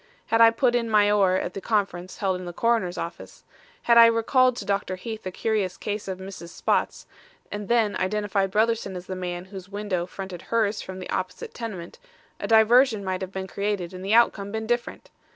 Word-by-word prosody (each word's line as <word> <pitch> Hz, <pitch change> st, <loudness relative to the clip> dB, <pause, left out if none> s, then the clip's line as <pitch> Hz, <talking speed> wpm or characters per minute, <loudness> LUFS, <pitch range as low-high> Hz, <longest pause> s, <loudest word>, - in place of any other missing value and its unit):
Had 225 Hz, 0 st, +3 dB
I 230 Hz, -, +9 dB
put 240 Hz, +2 st, +1 dB
in 235 Hz, -1 st, 0 dB
my 205 Hz, -1 st, +4 dB
oar 195 Hz, -3 st, +3 dB
at 180 Hz, -, -2 dB
the 195 Hz, -, -6 dB
conference 190 Hz, -5 st, -2 dB
held 190 Hz, -2 st, -1 dB
in 180 Hz, -, -7 dB
the 175 Hz, -, -6 dB
coroner's 225 Hz, -4 st, 0 dB
office; 170 Hz, -, -7 dB, 0.4 s
had 235 Hz, -1 st, +6 dB
I 230 Hz, -, +10 dB
recalled 245 Hz, +2 st, +3 dB
to 205 Hz, -, -6 dB
Dr. 200 Hz, -1 st, -1 dB
Heath 220 Hz, +3 st, -7 dB
the 185 Hz, -, -5 dB
curious 205 Hz, -2 st, -1 dB
case 205 Hz, 0 st, -4 dB
of 190 Hz, -1 st, -4 dB
Mrs. 190 Hz, -2 st, -9 dB
Spotts, -, -, -1 dB, 0.5 s
and 205 Hz, -1 st, -5 dB
then 230 Hz, -3 st, +2 dB
identified 195 Hz, 0 st, 0 dB
Brotherson 220 Hz, -1 st, 0 dB
as 180 Hz, 0 st, -7 dB
the 185 Hz, -, -5 dB
man 180 Hz, -1 st, -5 dB
whose 190 Hz, -1 st, -10 dB
window 200 Hz, -4 st, -3 dB
fronted 190 Hz, -2 st, -7 dB
hers 220 Hz, -2 st, 0 dB
from 185 Hz, 0 st, -8 dB
the 185 Hz, -, -8 dB
opposite 185 Hz, 0 st, -4 dB
tenement, 215 Hz, -, -7 dB, 0.4 s
a 200 Hz, -, -3 dB
diversion 225 Hz, 0 st, +5 dB
might 185 Hz, -1 st, -3 dB
have 190 Hz, 0 st, -5 dB
been 190 Hz, -1 st, -4 dB
created 200 Hz, -2 st, -3 dB
and 185 Hz, 0 st, -8 dB
the 200 Hz, +3 st, +2 dB
outcome 200 Hz, -4 st, +3 dB
been 220 Hz, 0 st, -3 dB
different. 240 Hz, +1 st, -3 dB
200 Hz, 205 wpm, -25 LUFS, 185-225 Hz, 0.5 s, I